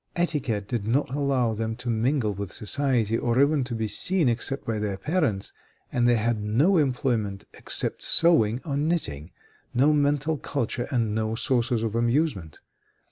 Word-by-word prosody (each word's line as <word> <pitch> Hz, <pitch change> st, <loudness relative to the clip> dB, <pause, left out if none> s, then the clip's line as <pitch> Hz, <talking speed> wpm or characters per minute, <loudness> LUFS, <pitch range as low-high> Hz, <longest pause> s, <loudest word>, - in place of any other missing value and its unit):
Etiquette 130 Hz, -, -1 dB
did 110 Hz, -3 st, -3 dB
not 130 Hz, +4 st, +1 dB
allow 135 Hz, -5 st, +1 dB
them 110 Hz, +1 st, -3 dB
to 125 Hz, -, -9 dB
mingle 115 Hz, 0 st, +1 dB
with 100 Hz, -2 st, -6 dB
society, 115 Hz, -1 st, 0 dB
or 120 Hz, +1 st, 0 dB
even 140 Hz, 0 st, +3 dB
to 125 Hz, -1 st, -4 dB
be 110 Hz, -1 st, -2 dB
seen 180 Hz, -, +2 dB
except 125 Hz, +4 st, -1 dB
by 110 Hz, -2 st, -2 dB
their 105 Hz, -2 st, -2 dB
parents, 145 Hz, -, -1 dB, 0.4 s
and 120 Hz, -1 st, +2 dB
they 120 Hz, -, +4 dB
had 115 Hz, -1 st, 0 dB
no 135 Hz, -, +2 dB
employment 120 Hz, -8 st, 0 dB
except -, -, -2 dB
sewing 120 Hz, -10 st, +3 dB
or 140 Hz, -4 st, -2 dB
knitting, 140 Hz, -, -1 dB, 0.5 s
no 140 Hz, +5 st, +4 dB
mental 145 Hz, +1 st, +1 dB
culture 120 Hz, -2 st, -3 dB
and 115 Hz, -5 st, 0 dB
no 110 Hz, 0 st, -1 dB
sources 120 Hz, -2 st, 0 dB
of 110 Hz, -2 st, -2 dB
amusement. 115 Hz, -, -1 dB
120 Hz, 160 wpm, -25 LUFS, 110-145 Hz, 0.5 s, they